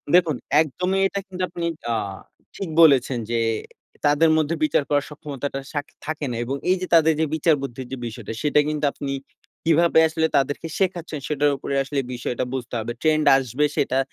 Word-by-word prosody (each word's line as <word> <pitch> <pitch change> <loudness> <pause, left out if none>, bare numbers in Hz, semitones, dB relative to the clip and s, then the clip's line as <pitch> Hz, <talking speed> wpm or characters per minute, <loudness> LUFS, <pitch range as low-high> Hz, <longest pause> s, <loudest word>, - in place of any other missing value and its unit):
দেখুন 165 -6 +4 0.2
একদমই। 180 +5 0
এটা 200 - -4
কিন্তু 185 -1 -4
আপনি 170 -1 -6 0.3
আ - - +2 0.6
ঠিক 190 -4 -4
বলেছেন 135 -5 +5
যে, - - +1 0.7
তাদের 150 +3 +4
মধ্যে 160 +2 +1
বিচার 150 -1 +2
করার 145 -1 +2
সক্ষমতাটা 145 -2 -5
সাখ 145 0 -2 0.2
থাকে 155 -1 -3
না। - - -3
এবং 135 +3 -2
এই 185 - +5
যে 185 - -3
তাদের 160 0 +5
যে 160 - +3
বিচার 160 0 +3
বুদ্ধির 130 -2 -6
যে 135 - -4
বিষয়টা, 115 -1 -7
সেটা 150 0 +3
কিন্তু 150 -1 -1
আপনি 140 -1 -5 0.5
কিভাবে 165 0 +4
আসলে 160 0 0
তাদেরকে 145 +4 -1
শেখাচ্ছেন? 175 -5 -1
সেটার 145 -1 +2
উপরে 140 - -4
আসলে 140 +1 -2
বিষয়টা 120 0 -3
বুঝতে 125 -2 -5
হবে। 115 +2 -4
ট্রেন্ড 155 -1 +2
আসবে 135 +3 0
সেটা 130 -1 +1
150 Hz, 180 wpm, -23 LUFS, 135-160 Hz, 0.7 s, বলেছেন